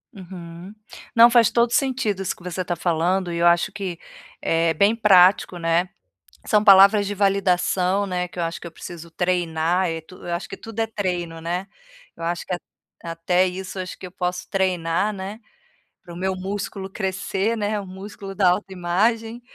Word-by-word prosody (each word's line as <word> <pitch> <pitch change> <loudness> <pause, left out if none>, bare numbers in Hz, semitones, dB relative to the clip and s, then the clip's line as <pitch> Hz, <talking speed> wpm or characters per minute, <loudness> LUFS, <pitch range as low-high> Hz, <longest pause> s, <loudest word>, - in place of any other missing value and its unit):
Uhum. 180 0 -10 0.4
Não, 235 +1 +9
faz 235 -4 +5
todo 235 0 +2
sentido 240 -6 0
isso 190 - -2
que - - -18
você 180 +1 -3
tá 175 -1 -2
falando. 175 +2 0
E 170 - -3
eu 170 - +4
acho 170 0 +3
que 185 -4 -5 0.4
é 165 0 +1
bem 200 +7 +4
prático, 190 -4 +5
né. 170 +2 +1 0.6
São 210 -2 +3
palavras 200 0 +7
de 205 - -3
validação, 195 -1 +1
né, 180 -1 -2
que 180 - -13
eu 175 - 0
acho 165 0 -3
que - - -9
eu 170 - -7
preciso 170 0 -9
treinar. 175 0 0
Eh, 165 0 -3
tu 185 +3 -15
eu 175 - -4
acho 175 - -5
que 195 - -7
tudo 225 0 -7
é 225 - +2
treino, 180 -6 -3
né? 175 +3 -3 0.5
Eu - - -10
acho 170 0 -2
que 180 - -2
a - - -4 0.4
até 170 +2 +1
isso 185 +1 -6
acho 185 0 -5
que 185 - -8
eu - - -10
posso 180 -1 -3
treinar, 185 +1 0
né, 200 +3 -7 0.6
pro 170 -1 -11
meu 190 +1 -2
músculo 195 +1 -5
crescer, 195 +2 -2
né. 210 0 -1
O 200 - -7
músculo 195 +1 -9
da 190 -3 +4
autoimagem. 205 +5 0
185 Hz, 185 wpm, -23 LUFS, 175-200 Hz, 0.6 s, Não